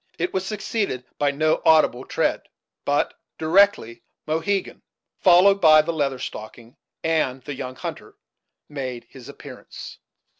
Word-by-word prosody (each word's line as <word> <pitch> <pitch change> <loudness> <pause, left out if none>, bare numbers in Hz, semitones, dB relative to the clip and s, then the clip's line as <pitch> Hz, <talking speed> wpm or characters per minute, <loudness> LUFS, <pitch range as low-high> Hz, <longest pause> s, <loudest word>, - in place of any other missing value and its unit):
It 175 +2 -2
was 190 - -1
succeeded 200 - -3
by 145 - +2
no 155 +2 +1
audible 155 -5 +4
tread; - - -1 0.4
but - - +1 0.2
directly 160 - +2 0.2
Mohegan, 175 +6 -2 0.4
followed 195 +2 +5
by 155 -1 +7
the 170 +2 -3
Leather 140 -4 -1
Stocking 115 0 -9 0.3
and 145 -6 0
the 145 - -6
young 130 -1 -6
hunter, - - -8 0.5
made 130 -5 -6
his 130 0 -12
appearance. 140 -2 -11
155 Hz, 125 wpm, -23 LUFS, 130-175 Hz, 0.5 s, by